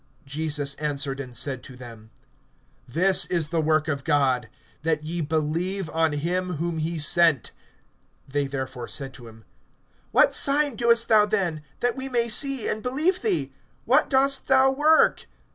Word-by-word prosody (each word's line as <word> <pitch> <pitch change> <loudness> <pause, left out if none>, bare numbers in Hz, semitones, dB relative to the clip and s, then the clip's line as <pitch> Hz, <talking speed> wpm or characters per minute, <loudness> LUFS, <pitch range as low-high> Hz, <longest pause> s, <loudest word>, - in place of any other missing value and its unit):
(29)Jesus 145 -1 -3
answered 140 -2 -2
and 125 -3 -7
said 135 -3 -2
to 130 - -12
them: 115 -3 -12 0.8
This 185 +7 +3
is 165 -4 -1
the 165 0 0
work 155 0 +1
of 140 -3 -3
God, 135 -6 +1 0.3
that 155 -1 -1
ye 170 +2 -4
believe 160 +4 -2
on 160 -1 0
him 180 +5 -2
whom 165 +1 -3
he 165 +2 -3
sent. 160 -2 +3 0.8
(30)They 140 -1 -1
therefore 130 -3 -5
said 135 +4 -4
to 120 -3 -12
him: 110 0 -15 0.7
What - - +4
sign 285 -1 +3
doest 235 0 +3
thou 210 -1 +4
then, 185 -7 -1 0.2
that 245 0 0
we 265 0 -5
may 235 -2 0
see, 270 +3 -1
and 215 - -2
believe 305 - 0
thee? 415 -5 -1 0.3
What - - +3
dost 275 0 +2
thou 265 0 +4
work? 300 +4 +3
160 Hz, 160 wpm, -24 LUFS, 140-225 Hz, 0.8 s, What